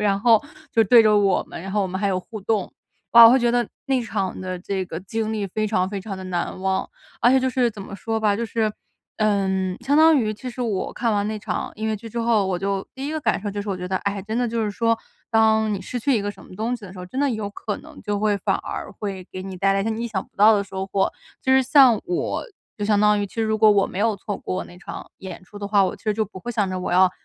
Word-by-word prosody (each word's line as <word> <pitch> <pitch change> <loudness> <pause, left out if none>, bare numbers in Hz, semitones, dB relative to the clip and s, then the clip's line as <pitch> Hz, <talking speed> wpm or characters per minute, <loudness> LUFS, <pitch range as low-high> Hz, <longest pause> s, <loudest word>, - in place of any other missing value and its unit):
然 200 -1 +2
后 225 -1 +5 0.3
就 225 -1 +3
对 230 +3 +7
着 215 -1 +4
我 195 -2 +2
们， - - -9
然 195 - -6
后 210 - +1
我 - - 0
们 185 +1 -4
还 200 - +1
有 185 -1 0
互 215 +2 -9
动。 205 -1 -1 0.4
哇， 235 0 +11
我 230 - +10
会 260 - +5
觉 240 - +3
得 240 0 +1 0.2
那 265 -2 +2
场 200 -4 -3
的 185 -1 -4
这 190 +1 -3
个 165 -1 -6
经 220 +3 -3
历 210 -2 -2
非 215 +3 -2
常 185 -3 +1
非 200 0 -4
常 195 0 -6
地 190 - -8
难 180 0 -3
忘。 190 0 -1 0.3
而 240 - +5
且 265 0 +5
就 260 - +1
是 250 -2 +1
怎 210 - -10
么 195 - -9
说 225 +2 -2
吧， 210 -2 +2
就 235 - -2
是， 220 -1 0 0.5
嗯， 190 -3 +1
相 270 +4 +1
当 320 +1 +7
于 220 -5 +1
其 255 - -7
实 250 - -8
我 210 -5 -2
看 235 -1 -1
完 205 0 0
那 215 0 -3
场 210 - -4
音 220 +1 -4
乐 220 -1 0
剧 220 +3 -11
之 235 +2 -3
后， 230 -4 +2
我 185 -2 -1
就 195 +1 -2
第 270 +1 -5
一 - - -3
个 315 - -2
感 220 -7 +1
受 205 - -3
就 205 +1 -4
是 205 - -8
我 190 - -2
觉 180 0 -6
得， 190 - 0
哎， 200 0 -2
真 215 +3 -4
的 245 0 +1
就 230 -1 -1
是 210 - -1
说， 230 +2 +1 0.3
当 220 -1 +3
你 200 - -2
失 245 +6 -5
去 270 +3 +1
一 - - 0
个 205 - -2
什 - - -14
么 - - -13
东 225 +5 -2
西 215 - -13
的 185 - -10
时 190 - -11
候， 180 - -7
真 255 - -6
的 285 0 +2
有 220 -3 -3
可 205 +1 -5
能 - - -13
就 205 -1 -2
会 210 -1 +2
反 195 - 0
而 - - -6
会 195 -3 -6
给 185 - -6
你 190 -1 -7
带 195 +2 +2
来 195 - +1
一 195 - -1
些 - - -1
你 225 +2 -3
意 - - -1
想 200 -5 -3
不 - - -45
到 215 +2 +7
的 200 - +1
收 190 -1 -5
获。 195 0 +1 0.3
就 260 - +2
是 265 - +6
像 260 -4 +6
我， 355 +1 -2 0.3
就 205 - -2
相 210 -1 +3
当 210 0 +4
于 205 - -1
其 - - -18
实 225 - 0
如 220 0 0
果 215 0 +6
我 200 -2 +4
没 - - -6
有 220 +1 +2
错 200 +1 -5
过 185 - -4
那 175 - -14
场 - - -9
演 190 -2 -8
出 205 +3 -12
的 205 - -4
话， 200 -1 +4
我 - - -2
其 - - -24
实 215 -1 +1
就 220 +1 0
不 195 -2 -11
会 240 +6 -5
想 205 -4 0
着 185 - -3
我 180 - -3
要 185 +1 +5
210 Hz, 325 characters per minute, -23 LUFS, 195-225 Hz, 0.5 s, 哇